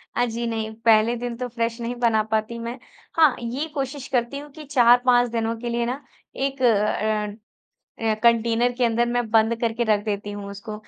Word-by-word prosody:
अ, 245 - +2
जी 235 0 -3
नहीं, 220 -1 -3
पहले 225 +1 +5
दिन 240 0 -4
तो 250 - -3
फ्रेश 230 0 -2
नहीं 240 +1 -3
बना 225 -3 +3
पाती 220 +2 -1
मैं। 235 +2 -5 0.4
हाँ, 305 -5 +6
ये 250 +7 -3
कोशिश 275 -1 -4
करती 245 +3 0
हूँ 295 0 -10
कि 310 +1 -11
4-5 245 -2 +4
दिनों 230 0 -1
के 240 0 -4
लिए 235 0 0
ना 260 +4 -3 0.3
एक 270 0 -2
अ 210 -2 +1 0.7
अ, 220 -1 +2
कंटेनर 235 +1 +3
के 250 - +1
अंदर 235 +1 +2
मैं 240 -2 -1
बंद 225 +1 +4
करके 235 0 0
रख 205 -1 +2
देती 205 0 -3
हूँ 200 -1 -7
उसको 210 +2 -8
235 Hz, 195 wpm, -23 LUFS, 220-245 Hz, 0.7 s, हाँ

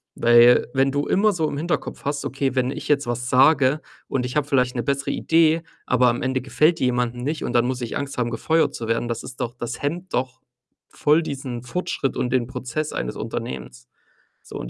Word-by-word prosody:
Weil, 120 +1 +6
wenn 135 0 +2
du 145 +1 -1
immer 210 +2 +3
so 160 -4 0
im 140 - -5
Hinterkopf 170 +2 -3
hast: 145 0 -2
„Okay, 135 -1 -2
wenn 130 0 +1
ich - - -6
jetzt 145 -1 +2
was 120 +1 -3
sage 135 +2 +4 0.3
und 125 -2 -1
ich 125 - -5
habe 145 - 0
vielleicht 125 -3 +1
‘ne 120 - -1
bessere 140 +3 -1
Idee, 165 0 +3 0.2
aber 125 0 +3
am 120 - -1
Ende 130 0 -1
gefällt 155 +5 +2
die - - +1
jemanden 120 0 -1
nicht 155 +3 -2
und 120 - -3
dann 120 0 +3
muss 125 0 -2
ich 120 - -3
Angst 140 -2 -5
haben, 120 -1 -1
gefeuert 160 +7 +1
zu 115 - -5
werden”, 115 +1 0
das 115 -1 -3
ist 130 0 -8
doch 120 0 -3
das 120 0 -5
hemmt 170 +6 -3
doch 130 0 -2 0.5
voll 150 +3 +2
diesen 130 -5 -5
Fortschritt 135 -1 -2
und 125 - -1
den 125 -3 +1
Prozess 130 +4 -4
eines - - -3
Unternehmens. 60 -1 -6 0.6
So, - - -9
und - - -6
130 Hz, 215 wpm, -23 LUFS, 120-145 Hz, 0.6 s, Weil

